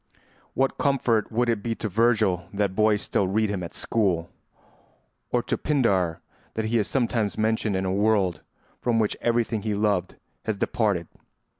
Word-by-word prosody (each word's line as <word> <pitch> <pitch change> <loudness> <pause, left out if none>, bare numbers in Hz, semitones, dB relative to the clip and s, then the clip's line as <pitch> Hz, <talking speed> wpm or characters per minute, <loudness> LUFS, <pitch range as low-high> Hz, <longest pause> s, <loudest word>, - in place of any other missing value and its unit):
What 135 0 +1
comfort 120 -7 +1
would 120 +2 +1
it 115 -3 +1
be 115 +2 -2
to 110 - -3
Virgil 105 -4 +2
that 100 -1 0
boys 105 0 +2
still 95 - 0
read 105 +2 +1
him 100 -3 -2
at 85 - -7
school, 90 -7 0 1.0
or - - +1
to - - -2
Pindar 100 - +1 0.3
that 110 - -1
he 115 +1 +1
is 105 - 0
sometimes 115 -5 0
mentioned 110 -1 +1
in 95 0 -1
a 95 - 0
world 100 -5 +2 0.4
from 120 -2 +1
which 110 -2 +1
everything 115 -2 +1
he 105 -1 -1
loved 100 -4 0 0.3
has 110 -2 -1
departed? 100 -6 0
110 Hz, 165 wpm, -25 LUFS, 95-115 Hz, 1.0 s, Virgil